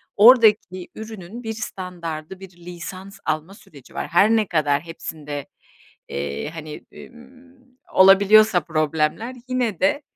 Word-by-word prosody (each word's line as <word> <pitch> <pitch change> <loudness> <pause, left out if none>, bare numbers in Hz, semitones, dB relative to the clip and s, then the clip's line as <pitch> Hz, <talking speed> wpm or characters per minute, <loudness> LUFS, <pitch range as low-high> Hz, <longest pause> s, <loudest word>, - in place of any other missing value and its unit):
oradaki 210 -5 +5
ürünün 220 +1 -9
bir 220 -1 -4
standardı, 180 -5 -7
bir 190 - -11 0.2
lisans 185 +3 -9
alma 155 +5 -2
süreci 145 - -17
var; - - -4
her 185 +5 +4
ne 220 -2 +2
kadar 145 -4 +1
hepsinde, 150 -3 -7 0.6
eee, 70 - -4
hani, 155 -2 -9
ımm, 255 +1 -17 0.2
olabiliyorsa 195 +1 +6
problemler 155 - -1
yine 245 -7 -1
de 290 +1 +1
190 Hz, 120 wpm, -22 LUFS, 160-225 Hz, 0.6 s, olabiliyorsa